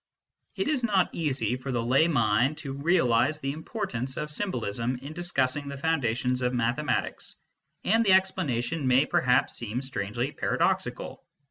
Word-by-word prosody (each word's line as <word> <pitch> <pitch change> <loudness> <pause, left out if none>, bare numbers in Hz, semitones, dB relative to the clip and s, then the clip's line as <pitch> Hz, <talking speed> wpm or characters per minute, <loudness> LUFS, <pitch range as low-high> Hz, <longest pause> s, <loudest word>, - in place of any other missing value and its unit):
It 195 - -1
is 290 -5 0
not 200 -5 +2
easy 130 -8 -1
for 130 +1 -5
the 120 -2 -1
lay 135 +7 +4
mind 125 0 +2
to 135 -3 -6
realise 140 -3 +2
the 135 -2 -3
importance 145 - -4
of 150 0 -3
symbolism 125 - -2
in 135 +5 -8
discussing 145 -5 0
the 140 0 -6
foundations 125 -5 0
of 125 0 0
mathe 120 +2 0
matics, 150 - -2 0.5
and 225 +3 +3
the 195 -4 +4
explanation 155 -6 +1
may 130 +3 +4
perhaps 125 -2 +2
seem 115 +1 -4
strangely 120 0 -2
paradoxical. - - -1
135 Hz, 150 wpm, -27 LUFS, 125-160 Hz, 0.5 s, lay